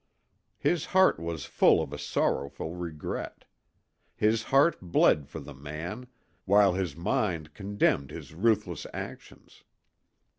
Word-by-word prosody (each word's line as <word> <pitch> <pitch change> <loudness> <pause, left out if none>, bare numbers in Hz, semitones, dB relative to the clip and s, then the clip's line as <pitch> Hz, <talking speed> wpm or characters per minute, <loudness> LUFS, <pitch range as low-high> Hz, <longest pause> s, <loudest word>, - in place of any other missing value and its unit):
His 175 -4 0
heart 190 0 +5
was 85 -3 -4
full - - +4
of - - -4
a - - -6
sorrowful 70 +3 -1
regret. 85 -4 -6 0.7
His 110 +1 +2
heart 140 +8 +3
bled 80 -5 +3
for 80 - -7
the 75 0 -10
man, 80 - -7 0.4
while 100 -1 +5
his 90 -6 -2
mind 85 -3 -1
condemned 100 -8 0
his - - -9
ruthless 110 +6 0
actions. - - -9
90 Hz, 120 wpm, -28 LUFS, 75-105 Hz, 0.7 s, heart